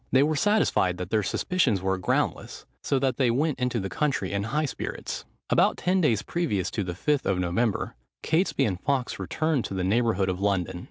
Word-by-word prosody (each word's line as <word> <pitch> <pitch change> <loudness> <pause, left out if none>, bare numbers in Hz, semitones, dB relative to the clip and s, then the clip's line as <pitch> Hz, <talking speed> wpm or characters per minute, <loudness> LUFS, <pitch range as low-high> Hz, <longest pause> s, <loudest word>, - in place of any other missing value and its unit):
They 130 +1 +5
were 155 +1 +1
satisfied 150 - +2
that 90 0 -6
their 110 -1 +3
suspicions 120 - +1
were 95 0 -1
groundless; - - -1 0.2
so 140 - 0
that 130 -2 0
they 130 -3 +3
went 135 +3 0
into 125 -1 0
the 95 - -3
country 135 -5 -1
in 100 0 -1
high 150 +7 0
spirits. 140 - -5 0.3
About - - +4
ten 185 +1 +1
days 120 - +2
previous 130 - -1
to 105 - -2
the 90 -1 -4
Fifth 145 - 0
of 95 - +1
November, 90 +5 0 0.3
Catesby 160 -4 +1
and 95 -6 -1
Fawkes 135 -3 -1
returned 155 -5 0
to 95 - -5
the 95 - -1
neighbourhood 100 -1 +2
of 95 0 -2
London. 95 -3 0
115 Hz, 200 wpm, -26 LUFS, 95-145 Hz, 0.3 s, They